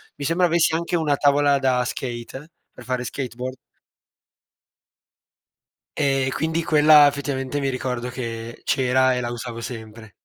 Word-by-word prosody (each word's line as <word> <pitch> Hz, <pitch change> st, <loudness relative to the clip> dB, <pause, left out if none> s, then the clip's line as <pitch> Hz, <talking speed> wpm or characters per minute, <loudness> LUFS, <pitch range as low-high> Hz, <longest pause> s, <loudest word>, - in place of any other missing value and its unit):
mi 140 Hz, -, -6 dB
sembra 175 Hz, +3 st, +2 dB
avessi 165 Hz, -1 st, +2 dB
anche 170 Hz, +1 st, -2 dB
una 150 Hz, -4 st, +1 dB
tavola 145 Hz, 0 st, +3 dB
da 130 Hz, -2 st, +1 dB
skate 130 Hz, +5 st, -6 dB, 0.2 s
per 125 Hz, -, -13 dB
fare 125 Hz, 0 st, -2 dB
skateboard. 130 Hz, 0 st, -5 dB, 2.4 s
E 135 Hz, -2 st, +1 dB
quindi 160 Hz, +2 st, -1 dB
quella 150 Hz, -1 st, +6 dB
effettivamente 140 Hz, -1 st, -3 dB
mi 135 Hz, -1 st, -1 dB
ricordo 125 Hz, -1 st, -3 dB
che 115 Hz, -2 st, -6 dB
c'era 130 Hz, 0 st, +2 dB
e 125 Hz, -, -2 dB
la 120 Hz, -, -3 dB
usavo 120 Hz, -1 st, -6 dB
sempre. 110 Hz, -2 st, -9 dB
130 Hz, 135 wpm, -22 LUFS, 125-145 Hz, 2.4 s, quella